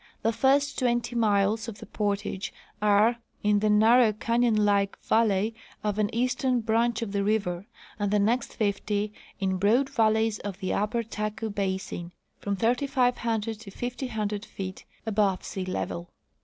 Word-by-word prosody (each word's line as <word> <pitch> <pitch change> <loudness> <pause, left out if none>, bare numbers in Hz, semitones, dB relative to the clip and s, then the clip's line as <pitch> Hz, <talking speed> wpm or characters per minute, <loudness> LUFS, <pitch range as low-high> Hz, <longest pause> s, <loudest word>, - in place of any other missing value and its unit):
The 225 +1 +2
first 280 +4 +2
twenty 240 -2 0
miles 215 0 +2
of 220 -3 -6
the - - -10
portage 205 -2 -2 0.3
are 210 +3 +4 0.3
in 210 0 +3
the 215 +1 +1
narrow 220 +2 +5
canyon 230 0 +2
like 200 -1 +2
valley 220 -1 +2 0.3
of 210 0 -1
an 210 -1 +2
eastern 250 +1 +1
branch 230 +1 +1
of 210 - -5
the 200 0 0
river, 200 -3 0 0.3
and 205 -1 0
the 210 - +2
next 225 +5 +1
fifty 205 0 -1 0.3
in 190 -1 0
broad 230 +8 +3
valleys 220 -3 +2
of 200 -2 -5
the 190 - -2
upper 215 +3 0
Taku 215 0 -4
basin, 190 -3 -3 0.3
from 200 0 -2
3,500 235 -2 0
to 225 -3 -10
5,000 220 -3 -3
feet 190 -2 -7 0.2
above 205 -3 +1
sea 190 -1 -4
level. 90 - -4
215 Hz, 150 wpm, -27 LUFS, 200-230 Hz, 0.3 s, narrow